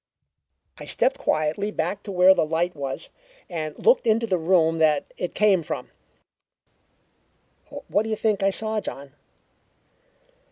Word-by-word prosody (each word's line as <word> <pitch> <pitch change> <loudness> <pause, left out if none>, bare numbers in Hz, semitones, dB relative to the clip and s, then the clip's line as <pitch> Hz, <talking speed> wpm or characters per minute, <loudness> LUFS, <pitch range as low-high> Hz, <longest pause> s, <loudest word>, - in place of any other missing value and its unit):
"I - - -8
stepped - - +1
quietly 155 - 0
back 205 -1 -3
to 205 - -8
where 185 0 +6
the - - +1
light 165 +3 -1
was, 135 -2 -4 0.4
and 155 -4 -5
looked 475 - +3
into 225 +1 +3
the 185 -5 0
room 165 -1 +2
that 155 -2 +1
it 180 - -5
came 205 -4 +3
from. 155 - -6 2.0
What 205 - +1
do 220 - -4
you 220 - 0
think 215 -2 0
I 195 - +3
saw, 220 +2 -1
John? 140 -5 -8
185 Hz, 145 wpm, -24 LUFS, 160-210 Hz, 2.0 s, where